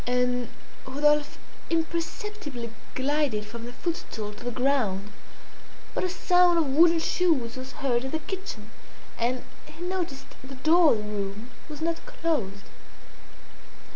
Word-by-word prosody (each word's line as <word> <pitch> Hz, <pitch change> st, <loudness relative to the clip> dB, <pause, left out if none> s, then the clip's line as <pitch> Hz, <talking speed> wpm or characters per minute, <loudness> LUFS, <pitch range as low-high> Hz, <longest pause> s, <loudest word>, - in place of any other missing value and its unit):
And 250 Hz, -1 st, +1 dB, 0.4 s
Rodolphe 295 Hz, +2 st, +2 dB, 0.3 s
imperceptibly 330 Hz, -, -2 dB, 0.2 s
glided 270 Hz, -5 st, +1 dB
from 230 Hz, +2 st, -7 dB
the -, -, -6 dB
footstool 245 Hz, -8 st, -4 dB
to -, -, -11 dB
the 245 Hz, -, -1 dB
ground; 240 Hz, -6 st, +1 dB, 0.8 s
but -, -, -1 dB
a 370 Hz, -, +1 dB
sound 355 Hz, -1 st, +4 dB
of 330 Hz, -, +4 dB
wooden 330 Hz, +5 st, +6 dB
shoes 320 Hz, -8 st, +2 dB
was 260 Hz, 0 st, -7 dB
heard 250 Hz, -2 st, 0 dB
in -, -, -2 dB
the 315 Hz, -, 0 dB
kitchen, 380 Hz, +5 st, -6 dB, 0.5 s
and 245 Hz, +2 st, 0 dB, 0.2 s
he 305 Hz, +3 st, -9 dB
noticed 355 Hz, -7 st, -2 dB, 0.2 s
the 270 Hz, +1 st, -8 dB
door 315 Hz, +4 st, +6 dB
of -, -, +1 dB
the 210 Hz, -, -5 dB
room 205 Hz, +4 st, -4 dB, 0.2 s
was 300 Hz, 0 st, -7 dB
not 330 Hz, 0 st, -1 dB
closed. 245 Hz, -, -1 dB
275 Hz, 140 wpm, -27 LUFS, 240-330 Hz, 0.8 s, wooden